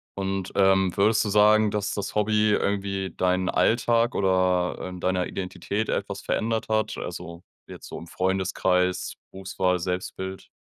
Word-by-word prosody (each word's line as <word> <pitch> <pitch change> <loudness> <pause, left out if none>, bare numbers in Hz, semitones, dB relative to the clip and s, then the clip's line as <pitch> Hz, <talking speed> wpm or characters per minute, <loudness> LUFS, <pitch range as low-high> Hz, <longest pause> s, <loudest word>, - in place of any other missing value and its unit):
Und, 95 -1 -3
ähm, 95 -1 +4
würdest 105 +2 +3
du 105 - -2
sagen, 105 +1 +5
dass 105 0 -2
das 100 0 -4
Hobby 105 0 +2
irgendwie 100 -2 -1
deinen 90 0 +1
Alltag 115 +4 +2
oder 95 -2 +1
in 90 0 -8
deiner 90 0 0
Identität 95 +3 -3
etwas 100 0 -3
verändert 110 0 -1
hat, 110 0 0
also 85 +1 -7 0.2
jetzt - - -10
so - - -7
im 85 - -9
Freundeskreis, 90 0 0 0.2
Berufswahl, 95 -1 -1
Selbstbild? 95 +2 -5
95 Hz, 140 wpm, -25 LUFS, 90-105 Hz, 0.2 s, sagen